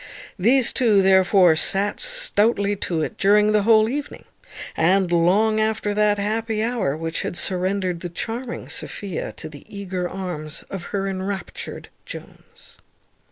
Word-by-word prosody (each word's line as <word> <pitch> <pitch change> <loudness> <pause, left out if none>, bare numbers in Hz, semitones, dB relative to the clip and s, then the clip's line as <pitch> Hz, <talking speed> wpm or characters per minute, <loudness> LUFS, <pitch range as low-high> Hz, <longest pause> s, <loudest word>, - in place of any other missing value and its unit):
These 240 +6 +3
two, 215 -6 +3
therefore, 190 -2 +5
sat 195 +5 +1
stoutly 225 - +2
to 165 -4 -2
it - - -6
during 210 +2 +4
the 210 -1 +3
whole 220 0 +5
evening, 285 +4 -5 0.5
and 180 +2 +2
long 200 +6 +3
after 215 -1 0
that 210 0 +2
happy 220 +1 -1
hour 225 - -1
which 165 0 -3
had 175 - -4
surrendered 185 -1 0
the 175 - -6
charming 235 +7 -5
Sophia 195 -5 -4
to - - -8
the 145 -2 -12
eager 185 -3 -4
arms 170 -5 -6
of 190 -3 -6
her 195 -1 -3
enraptured 190 0 -5 0.2
Jones. - - -12
200 Hz, 140 wpm, -22 LUFS, 180-215 Hz, 0.5 s, therefore